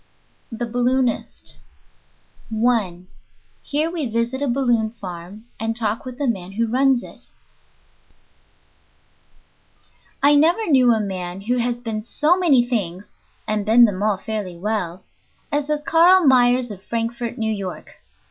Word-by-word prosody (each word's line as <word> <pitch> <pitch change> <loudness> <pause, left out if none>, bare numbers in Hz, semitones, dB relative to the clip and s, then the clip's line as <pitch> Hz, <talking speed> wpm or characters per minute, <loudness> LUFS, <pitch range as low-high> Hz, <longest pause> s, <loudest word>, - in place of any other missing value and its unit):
THE 235 +1 -3
BALLOONIST 245 +1 -1 0.9
I 220 -6 0 0.6
HERE 305 +3 -1
WE 315 -8 -3
VISIT 235 +4 -1
A 285 - 0
BALLOON 240 -4 +1
FARM 185 +2 -9
AND 225 0 -2
TALK, 220 +1 -2
WITH 255 -1 -7
THE 285 - -2
MAN 195 -6 -3
WHO 230 +3 0
RUNS 255 +2 +2
IT - - -12 3.0
I 290 +1 +6
NEVER 335 +6 +3
knew 255 -3 +5
a 225 - +2
man 185 -2 -4
who 245 +5 -1
has 240 0 -1
been 220 -3 -4
so 300 +9 +2
many 300 -10 +3
things 200 -6 -3 0.4
(and 215 -1 0
been 230 +3 +6
them 200 -3 -2
all 210 -2 +1
fairly 195 -3 -5
well) 185 -2 -3 0.5
as 290 -1 0
has 300 0 -1
Carl 345 +3 +5
Myers 250 -2 +4
of 195 -2 -9
Frankfort, 230 +2 -4
New 220 -1 -1
York. 195 -3 -7
235 Hz, 140 wpm, -21 LUFS, 210-260 Hz, 3.0 s, I